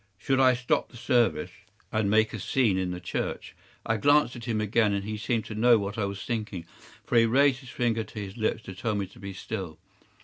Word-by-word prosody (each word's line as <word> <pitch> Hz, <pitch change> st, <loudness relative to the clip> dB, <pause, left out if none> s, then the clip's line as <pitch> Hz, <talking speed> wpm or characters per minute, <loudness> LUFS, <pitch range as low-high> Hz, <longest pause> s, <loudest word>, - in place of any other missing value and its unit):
Should 135 Hz, +6 st, 0 dB
I 130 Hz, -1 st, +5 dB
stop 125 Hz, 0 st, 0 dB
the -, -, -13 dB
service 120 Hz, 0 st, +1 dB, 0.4 s
and 110 Hz, -2 st, +1 dB
make 110 Hz, +1 st, +3 dB
a 110 Hz, -, -4 dB
scene 115 Hz, 0 st, +2 dB
in 95 Hz, -1 st, -1 dB
the 90 Hz, 0 st, -4 dB
church? 85 Hz, -, -4 dB, 0.3 s
I 110 Hz, -, +1 dB
glanced 145 Hz, +2 st, +3 dB
at 120 Hz, -, -8 dB
him 115 Hz, -3 st, -1 dB
again, 105 Hz, 0 st, +2 dB
and 100 Hz, 0 st, -1 dB
he 110 Hz, +1 st, -3 dB
seemed 110 Hz, +1 st, -1 dB
to -, -, -7 dB
know 115 Hz, +2 st, +5 dB
what 100 Hz, +1 st, -4 dB
I 105 Hz, -, +1 dB
was 100 Hz, 0 st, -5 dB
thinking, 105 Hz, -7 st, -3 dB, 0.4 s
for 120 Hz, -, +3 dB
he 115 Hz, -, +4 dB
raised 135 Hz, +2 st, +4 dB
his 130 Hz, -3 st, -13 dB
finger 115 Hz, -1 st, 0 dB
to 105 Hz, +1 st, -9 dB
his 100 Hz, -1 st, -6 dB
lips 110 Hz, -1 st, -1 dB
to 95 Hz, -, -8 dB
tell 110 Hz, +3 st, -2 dB
me 100 Hz, -1 st, -1 dB
to 95 Hz, -, -17 dB
be 100 Hz, 0 st, -7 dB
still. 95 Hz, -4 st, -6 dB
110 Hz, 235 wpm, -27 LUFS, 100-120 Hz, 0.4 s, I